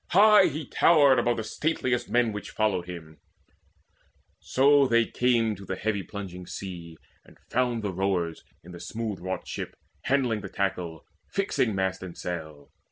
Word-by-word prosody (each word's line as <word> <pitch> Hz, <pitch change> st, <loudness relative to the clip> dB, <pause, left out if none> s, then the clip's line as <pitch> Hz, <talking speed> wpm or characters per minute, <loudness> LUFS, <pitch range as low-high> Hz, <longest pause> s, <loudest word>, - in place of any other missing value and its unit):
High 210 Hz, +1 st, +7 dB
he 155 Hz, -1 st, -4 dB
towered 140 Hz, -3 st, +5 dB
Above 120 Hz, 0 st, +1 dB
all 110 Hz, -, -2 dB
stateliest 130 Hz, -1 st, -1 dB
men 120 Hz, -2 st, +2 dB
which 105 Hz, 0 st, -6 dB
followed 95 Hz, -5 st, 0 dB
him. 80 Hz, -3 st, -9 dB, 1.2 s
So 140 Hz, +1 st, +4 dB
came 115 Hz, 0 st, +2 dB
they 105 Hz, -, -2 dB
to 100 Hz, -, -11 dB
the 95 Hz, -, -4 dB
heavy 105 Hz, 0 st, -1 dB
plunging 90 Hz, -3 st, -8 dB
sea, 85 Hz, -4 st, -7 dB, 0.3 s
And -, -, -19 dB
found 120 Hz, -3 st, 0 dB
the 100 Hz, -2 st, -2 dB
rowers 90 Hz, -3 st, -1 dB, 0.2 s
in 90 Hz, -, -12 dB
the 85 Hz, -, -9 dB
smooth 110 Hz, -2 st, -4 dB
wrought 95 Hz, +1 st, -4 dB
ship -, -, -5 dB, 0.3 s
Handling 125 Hz, -5 st, +1 dB
the -, -, -7 dB
tackle, 90 Hz, -5 st, -3 dB, 0.2 s
fixing 160 Hz, -, 0 dB
mast 95 Hz, -1 st, -1 dB
and 95 Hz, -2 st, -8 dB
sail. 80 Hz, -5 st, -6 dB
105 Hz, 160 wpm, -27 LUFS, 90-125 Hz, 1.2 s, High